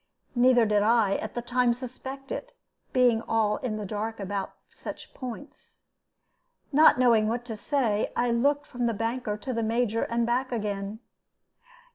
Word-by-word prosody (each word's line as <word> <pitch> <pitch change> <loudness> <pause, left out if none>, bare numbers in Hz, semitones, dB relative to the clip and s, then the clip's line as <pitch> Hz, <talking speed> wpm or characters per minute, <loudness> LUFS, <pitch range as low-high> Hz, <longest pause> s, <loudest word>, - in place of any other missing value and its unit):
Neither 245 -1 +5
did 210 -1 +2
I, 215 -2 +3
at - - -6
the 240 - -3
time, 245 0 +2
suspect 265 +2 -8
it, - - -6 0.3
being 245 -3 +4
all 225 -2 +1
in 225 -4 -3
the 210 - -4
dark 215 +3 -4
upon 195 0 -3 0.2
such - - -9
points. 255 +2 -9 0.9
Not 305 -1 +6
knowing 230 -4 +4
what 235 +2 -2
to 225 -3 -5
say, 225 -3 0
I 245 0 +1
looked 285 +5 +2
from 245 -1 -2
the 230 - 0
banker 225 0 -2
to 255 +5 -4
the 230 - -1
Major, 230 0 0
and 235 0 0
back 250 +3 0
again. 210 -1 -3
235 Hz, 160 wpm, -27 LUFS, 215-250 Hz, 0.9 s, Not